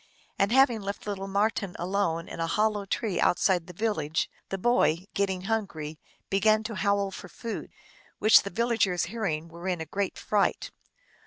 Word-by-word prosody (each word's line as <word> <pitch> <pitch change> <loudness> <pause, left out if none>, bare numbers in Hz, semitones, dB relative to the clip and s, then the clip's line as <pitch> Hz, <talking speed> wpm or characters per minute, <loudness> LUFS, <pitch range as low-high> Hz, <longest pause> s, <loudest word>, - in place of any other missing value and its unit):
And 200 +2 +3
having 250 -3 +4
left 200 +1 -5
lit 205 -1 -3
tle 195 +1 -5
Marten 200 -1 0
alone 175 -2 -1
in - - -8
a 165 - 0
hollow 210 +2 +1
tree 205 -1 -1
outside 175 -1 +2
the - - -8
village, 165 -6 -1 0.2
the 195 - -2
boy, 185 -6 +2
getting 190 -2 0
hungry, 185 -8 -3 0.3
began 215 +2 +3
to 225 +1 -4
howl 200 -1 +1
for 185 -1 -9
food; 230 +4 -6 0.5
which 215 - +7
the 200 - -5
villagers 225 -6 +1
hearing 165 -9 -2
were 170 +2 -8
in 180 -2 0
a 160 - -4
great 195 +3 -2
fright. 205 -2 0
200 Hz, 170 wpm, -28 LUFS, 175-215 Hz, 0.5 s, which